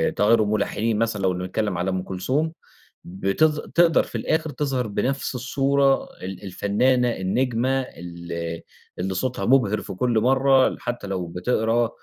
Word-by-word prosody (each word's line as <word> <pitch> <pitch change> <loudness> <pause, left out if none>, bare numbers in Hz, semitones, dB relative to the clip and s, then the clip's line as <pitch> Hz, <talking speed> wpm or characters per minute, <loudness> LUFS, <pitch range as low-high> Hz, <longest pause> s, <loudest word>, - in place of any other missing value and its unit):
تغيّر 110 +2 +4
الملحنين 105 +1 0
مثلًا 115 -3 0
لو 95 -1 +2
بنتكلّم 95 +2 -2
على 90 +2 -1
أم 95 -1 -1
كلثوم 135 - -1 0.5
بتظ 100 - +1
تقدر 170 -1 +3
في - - -11
الآخر 160 0 0
تظهر 130 -4 -2
بنفس 130 +5 -2
الصورة 135 +2 +2 0.2
ال 95 +1 -7
الفنّانة 120 +6 +1
النجمة 125 +6 0
ال 85 -7 -9 0.7
اللي 95 +1 -2
صوتها 125 +7 -2
مبهر 115 -5 +3
في - - -7
كل 115 +4 +1
مرّة 130 +2 +3
حتّى 120 -4 -4
لو 95 -2 -3
بتقرأ 110 +6 0
115 Hz, 140 wpm, -23 LUFS, 95-130 Hz, 0.7 s, تغيّر